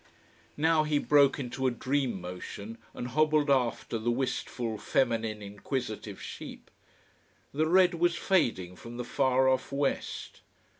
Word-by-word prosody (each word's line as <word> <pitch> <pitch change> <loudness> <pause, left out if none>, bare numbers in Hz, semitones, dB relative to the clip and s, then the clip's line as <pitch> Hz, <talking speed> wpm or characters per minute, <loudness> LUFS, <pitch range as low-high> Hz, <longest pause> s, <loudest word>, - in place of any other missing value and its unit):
Now 160 +1 +4
he 150 -1 +1
broke 145 -1 +4
into 130 -1 -2
a - - +4
dream 130 -2 -1
motion 100 +5 -7 0.2
and 125 - -4
hobbled 155 +1 +3
after 120 -3 +1
the 115 +2 -1
wistful, 120 -2 -2
feminine, 115 -4 0
inquisitive 105 0 -5
sheep. - - -9 0.8
The 155 +3 +1
red 180 +1 +5
was 170 0 +2
fading 115 - +1
from 120 +1 -9
the 125 - -4
far 130 +1 +2
off 130 +1 +1
west. 140 0 -2
130 Hz, 135 wpm, -29 LUFS, 115-145 Hz, 0.8 s, red